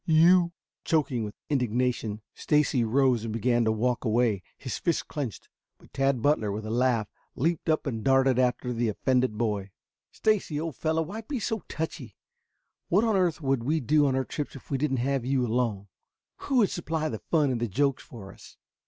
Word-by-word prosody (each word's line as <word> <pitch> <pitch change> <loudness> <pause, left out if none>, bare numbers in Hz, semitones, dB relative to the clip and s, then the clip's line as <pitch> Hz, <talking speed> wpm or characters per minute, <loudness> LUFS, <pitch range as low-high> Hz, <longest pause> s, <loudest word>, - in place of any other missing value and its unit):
You 170 +2 +5 0.2
" - - -67
Choking 140 -7 +1
with 105 -1 -6
indignation, 125 -5 -1
Stacy 150 -5 +1
rose 125 0 +2
and 115 - -4
began 120 +2 +1
to 110 - +3
walk 120 +3 0
away, 115 -4 +1 0.2
his 130 - -5
fists 170 - 0
clenched. 140 -8 -5 0.3
But - - -21
Tad 135 -3 +1
Butler, 145 -8 +2
with 105 +2 -4
a 110 - -4
laugh, 120 -3 +1 0.3
leaped 160 +3 -1
up 155 - +1
and 115 -6 -3
darted 135 -1 +3
after 125 0 +1
the 115 -1 0
offended 125 +1 0
boy. 105 -4 -1 0.4
"Stacy, 200 -8 0
old 160 -3 -4
fellow, 160 +6 0
why 205 +8 -6
be 255 +4 -4
so 220 +1 -2
touchy? 145 - -5 0.7
What 195 +6 +4
on 225 -3 +2
earth 175 -4 +1
would 135 -4 0
we 155 +6 +1
do 145 +3 +3
on 130 - +1
our 130 0 0
trips 150 -1 -5
if 135 - -13
we 135 - 0
didn't 135 -2 0
have 135 +1 0
you 130 0 +1
along? 110 -4 -1 0.5
Who 275 - -3
would 215 -5 +4
supply 160 -2 -2
the 110 -7 -4
fun 150 -5 +1
and 120 -2 -2
the 120 - 0
jokes 140 +6 0
for 100 -5 -11
us?" - - -16
130 Hz, 195 wpm, -27 LUFS, 115-155 Hz, 0.7 s, You